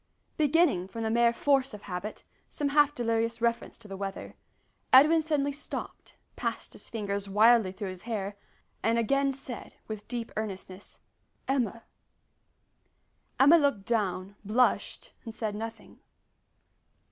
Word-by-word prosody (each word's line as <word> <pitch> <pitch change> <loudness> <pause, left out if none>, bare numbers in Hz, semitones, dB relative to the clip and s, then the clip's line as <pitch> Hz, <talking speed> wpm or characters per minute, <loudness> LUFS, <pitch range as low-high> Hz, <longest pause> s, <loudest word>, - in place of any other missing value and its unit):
Beginning, 300 - +3
from 225 +4 -6
the 220 - 0
mere 235 0 +4
force 270 -1 +1
of 205 - -12
habit, 190 +2 -6 0.3
some 290 -2 -2
half 290 0 +4
delirious 230 -1 0
reference 235 0 -1
to 225 - -13
the 195 - -7
weather, 195 0 -6 0.6
Edwin 305 +5 +7
suddenly 295 -3 0
stopped, 285 +1 -7 0.2
passed - - -4
his - - -11
fingers 200 -3 -3
wildly 220 0 +5
through 195 0 -5
his 185 -1 -9
hair, 205 -4 -4 0.5
and 225 +1 +2
again 275 +4 +2
said, 260 -2 -8
with 215 -1 -7
deep 235 -2 -4
earnestness, 195 -2 -6 0.5
"Emma." 235 -4 -1 1.6
Emma 295 +5 +8
looked 280 -10 +1
down, 200 -4 -1
blushed, 230 +5 +1
and 225 -2 -8
said 215 -2 -2
nothing. 225 +2 -8
230 Hz, 135 wpm, -29 LUFS, 205-270 Hz, 1.6 s, Emma